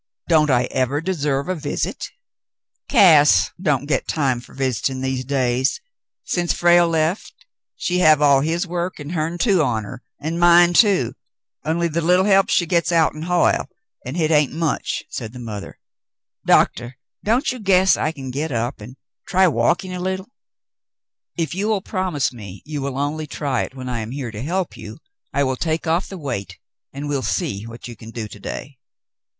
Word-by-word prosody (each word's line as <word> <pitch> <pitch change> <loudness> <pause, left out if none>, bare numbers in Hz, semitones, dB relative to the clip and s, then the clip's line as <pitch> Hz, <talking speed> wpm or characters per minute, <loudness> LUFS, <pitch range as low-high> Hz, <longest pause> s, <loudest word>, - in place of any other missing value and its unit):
"Don't 155 -3 +4
I 125 -2 +3
ever 130 +3 0
deserve 150 -5 -1
a 185 - 0
visit 160 - -3 0.4
?" - - -52
"Cass 150 - +6
don't 145 -6 +1
get 145 - -1
time 135 -6 0
fer - - -16
visitin' 130 0 -1
these 130 -1 -2
days. 130 -1 0 0.4
Since 175 -1 0
Frale 175 0 +4
lef 160 +4 0 0.4
she 180 0 -1
have 155 -4 +6
all 140 -2 +5
his 165 +5 -1
work 175 0 -4
an' 145 +1 -7
hern 165 0 -2
too 190 -2 +3
on 115 -7 0
her, 125 +5 -9 0.2
an' 160 +3 -3
mine 175 0 +6
too, 180 - +4 0.5
only 170 +2 0
the 170 +1 -2
leetle 180 +3 +3
help 195 -1 +4
she 175 - +3
gets 170 +1 +1
out'n 160 -2 +2
Hoyle, 180 0 +2 0.3
an' 130 +4 -6
hit 165 -2 +1
hain't 150 -3 +3
much," 160 0 -2
said 115 -2 -6
the 125 - -9
mother. 110 -4 -7 0.7
"Doctah, 120 +1 +2 0.3
don't 245 +8 +1
ye 250 - -6
guess 190 -2 +4
I 155 - -1
can 135 -5 -7
get 145 +4 -3
up 120 0 -2
an' 120 +5 -10 0.3
try 190 +1 +4
walkin' 170 +7 +1
a 180 - -4
leetle? 190 +4 -3 0.6
" - - -71 0.3
"If 165 -1 -1
you 195 +4 -2
will 215 -3 +1
promise 185 - -1
me 100 -5 -10
you 150 -2 -4
will 135 -1 -3
only 150 +2 -2
try 140 -4 -2
it - - -6
when 130 -1 -7
I 125 -2 -2
am 110 0 -5
here 130 -2 -5
to 105 0 -7
help 175 +6 -2
you, - - -9 0.3
I 140 +1 +1
will 130 -1 -1
take 160 +2 -2
off 165 +3 0
the 195 - -8
weight, 130 - -5 0.3
and 140 +2 -6
we'll 145 -2 -1
see 120 - -2
what 115 +1 -9
you 120 - -9
can 110 +1 -12
do 115 -1 -5
to 105 - -12
day." 130 +6 -7
150 Hz, 190 wpm, -21 LUFS, 130-175 Hz, 0.7 s, Cass